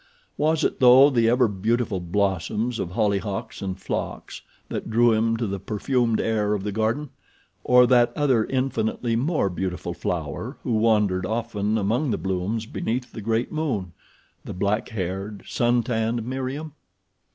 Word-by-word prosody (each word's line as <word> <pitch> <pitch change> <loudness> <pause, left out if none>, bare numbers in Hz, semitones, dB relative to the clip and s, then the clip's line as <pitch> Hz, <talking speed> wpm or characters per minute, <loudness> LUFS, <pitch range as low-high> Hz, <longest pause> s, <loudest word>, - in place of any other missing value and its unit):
Was 155 +1 +1
it, - - 0
though, 130 +3 +7
the 115 -3 +3
ever 125 0 +4
beautiful 110 +1 -1
blossoms 100 +5 -1
of 85 - -2
hollyhocks 105 +2 -2
and 95 -1 -4
phlox - - -5 0.3
that - - -5
drew 115 +1 +4
him 115 +1 +1
to 115 - -1
the 100 -1 -3
perfumed 115 +3 0
air 105 -2 +1
of 100 - -4
the 105 - -2
garden, 115 +7 -1 0.5
or 125 0 +6
that 120 -1 +4
other 135 -7 +2
infinitely 125 -3 -1
more 140 - +1
beautiful 90 0 -3
flower - - -4
who - - -2
wandered 105 -4 +2
often 110 -2 -1
among 115 +8 0
the 110 - 0
blooms 95 +4 -2
beneath 125 +2 -3
the 110 - -7
great 115 +3 -1
moon—the 110 - -6
black 100 +4 0
haired, 95 -1 -4
suntanned 120 -1 0
Meriem? 135 +4 -4
110 Hz, 145 wpm, -24 LUFS, 100-125 Hz, 0.5 s, though